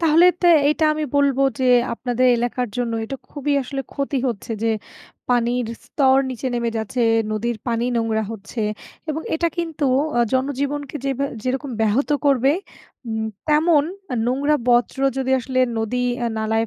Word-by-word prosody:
তাহলে 330 +1 +5 0.2
তো 350 - +4 0.2
এইটা 305 +2 +2
আমি 305 0 -2
বলবো 280 -1 +3 0.2
যে 260 - 0 0.3
আপনাদের 245 +1 0
এলাকার 245 +1 -1
জন্য 245 -2 -1
এটা 270 +5 -5
খুবই 290 0 -2
আসলে 270 +1 -4
ক্ষতি 280 0 -2
হচ্ছে 230 +1 -4
যে 230 - +2 0.6
পানির 245 0 +1 0.2
স্তর 265 -2 +3
নিচে 255 +1 -5
নেমে 235 -1 0
যাচ্ছে, 220 +3 -3 0.3
নদীর 220 +2 -1
পানি 235 0 0
নোংরা 225 -1 0
হচ্ছে 220 +2 -7 0.5
এবং 310 +2 -3
এটা 335 +1 +1
কিন্তু 325 -3 -2 0.3
অ - - +3
জনজীবনকে 280 +2 -1
যেবা 275 0 0 0.2
যেরকম 265 +2 -2
ব্যাহত 220 +5 +2 0.2
করবে, 270 0 +4 0.6
উম 220 -1 -2 0.2
তেমন 305 0 +4 0.4
নোংরা 280 +4 +2
বর্জ্য 245 +1 +3 0.2
যদি 260 0 -1
আসলে 255 +1 -3 0.2
নদী 225 +3 -1 0.2
আ - - +1
নালায় 220 +1 0
255 Hz, 150 wpm, -21 LUFS, 235-285 Hz, 0.6 s, তাহলে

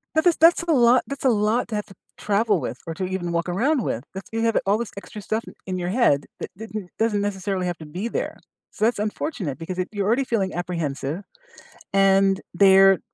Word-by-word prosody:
That 315 - +3
this 350 -2 +5
that's 335 +1 +5
a 340 - 0
lot 245 -2 +5
that's 280 0 -6
a - - +6
lot 220 +2 +1
to 220 - -3
have 210 - -2
to 195 - -15 0.2
travel 210 -1 +1
with, 120 - -4
or 165 - -4
to 185 +3 -3
even 180 -2 -3
walk 170 +1 -1
around 255 - +1
with, 120 - -2
that's 195 0 -8
you 225 - -2
have 230 -1 +2
all 200 +2 +3
this 235 -2 -4
extra 205 +1 -9
stuff 220 +3 -2 0.2
in 185 -1 -3
your 175 0 -2
head 185 - +3
that - - -5
didn't 215 -3 -7
doesn't 220 -2 +1
necessarily 195 -2 -2
have 175 -1 -2
to 160 - -9
be 180 +9 -4
there, - - -3 0.3
so 215 - 0
that's 230 -2 +1
unfortunate 210 - -3
because 180 +2 -6
if 185 - -1
you're 205 -2 -2
already 235 +6 +2
feeling 210 -7 -1
apprehensive, 170 -1 -3 0.7
and 195 0 +4
they're 195 0 +6
200 Hz, 220 wpm, -23 LUFS, 180-225 Hz, 0.7 s, a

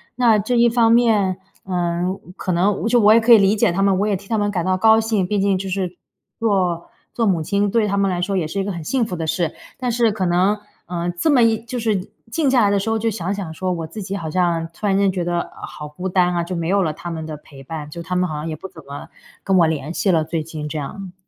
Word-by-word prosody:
那 235 -3 +4
这 225 +5 -1
一 235 - +5
方 230 -1 +3
面， 215 -6 +3 0.3
呃， 175 -1 -1 0.2
可 185 - -3
能 190 +5 +1
就 240 +1 +4
我 210 -1 +6
也 230 - +5
可 235 +2 +3
以 230 - +11
理 200 0 +4
解 205 - +2
她 185 +3 -1
们， 195 -1 +3
我 205 - +1
也 205 -2 +1
替 200 +1 -16
她 225 - 0
们 205 -1 0
感 180 -4 -2
到 185 0 +2
高 220 +3 +5
兴。 220 -4 0
毕 205 +3 -1
竟 195 -1 +2
就 190 +1 -5
是 180 -2 -3 0.4
做 185 -6 0 0.2
做 230 - 0
母 180 -6 +2
亲 200 +4 0
对 225 -2 +2
她 200 - 0
们 200 -1 +1
来 175 -1 -2
说 195 +2 -1
也 180 - 0
是 195 +6 -4
一 195 - -1
个 205 - -2
很 170 -2 -6
幸 250 +8 0
福 180 - -5
的 165 -2 -3
事。 165 -1 -1 0.2
但 250 -1 -2
是 230 -1 +2
可 200 -3 -2
能， 185 +4 +2 0.3
呃， 175 0 -2
这 175 - 0
么 255 -4 +5
一 225 -1 +3
就 245 +1 -5
是 210 -5 -1 0.2
静 275 +3 +1
下 255 -2 +4
来 205 - +4
的 200 0 +2
时 210 +3 -2
候， 225 0 +1
就 230 - 0
想 195 -3 -3
想 190 -6 -5
说， 185 +3 -2
我 165 -2 -3
自 210 +7 -8
己 195 +1 -4
好 160 -4 -5
像 170 -1 0
突 210 - -7
然 195 -1 +2
间 200 0 +3
觉 180 -2 -2
得 175 0 -2
好 150 - -7
孤 180 +6 -5
单 180 -1 +2
啊。 170 - 0
就 175 +2 -5
没 165 -1 -2
有 195 +2 +2
了 155 - 0
她 175 +3 -8
们 160 -1 -5
的 155 -1 -6
陪 140 -2 -15
伴， 150 +1 -6
就 170 +3 -7
她 180 +2 -3
们 180 0 +1
好 155 - -4
像 150 +2 -4
也 155 - -4
不 190 - -8
怎 160 -4 -14
么 140 +1 -8 0.4
跟 195 - +2
我 165 - +5
联 155 0 -3
系 190 - +1
了， 160 -3 +2
最 160 0 -2
近 155 -1 -6
这 155 +1 -5
样。 185 +5 -6
190 Hz, 305 characters per minute, -20 LUFS, 170-210 Hz, 0.4 s, 以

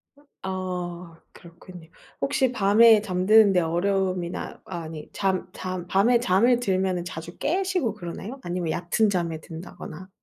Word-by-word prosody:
아 285 - -23 0.3
아 180 -2 -5
그렇군요. 170 -1 -14 0.3
혹시 265 -2 +1
밤에 215 +1 +6
잠드는데 200 0 +4
어려움이나 180 +1 -1
아니 160 -4 -7
잠 190 -2 -1
잠 185 -1 -5
밤에 225 +6 +3
잠이 235 +3 +3
들면은 190 -5 0
자주 170 -1 -8
깨시고 360 - 0
그러나요? 200 +7 -7
아니면 175 -2 -2
얕은 180 +6 +1
잠에 170 -4 -1
든다거나. 165 +2 -9
185 Hz, 295 characters per minute, -25 LUFS, 175-215 Hz, 0.3 s, 밤에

